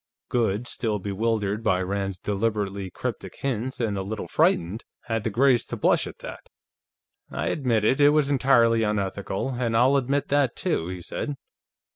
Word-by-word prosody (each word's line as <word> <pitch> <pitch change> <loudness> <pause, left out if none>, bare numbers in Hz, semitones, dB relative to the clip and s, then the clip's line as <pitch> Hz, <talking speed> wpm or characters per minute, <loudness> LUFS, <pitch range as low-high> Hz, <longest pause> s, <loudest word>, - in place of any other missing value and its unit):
Goode, 115 -1 0
still 110 -3 -1
bewildered 105 +1 -1
by 95 -5 +2
Rand's 95 0 -2
deliberately 100 -1 -2
cryptic - - -5
hints 130 -1 -2
and 105 -5 -1
a - - -1
little 105 +3 -5
frightened, 90 +7 +1 0.2
had 115 -2 -2
the 115 - 0
grace 125 +3 +3
to - - -4
blush - - +2
at - - -9
that. - - -9 0.8
"I - - -2
admit 120 -7 +1
it; 130 +5 +3
it 145 - +8
was 145 -1 +2
entirely 120 -4 +4
unethical, 100 +2 -2
and 120 -2 0
I'll 130 +4 +5
admit 140 +2 0
that, 145 -2 +2
too," 160 - -1
he 90 -1 -6
said. 145 - -4
115 Hz, 165 wpm, -25 LUFS, 100-130 Hz, 0.8 s, it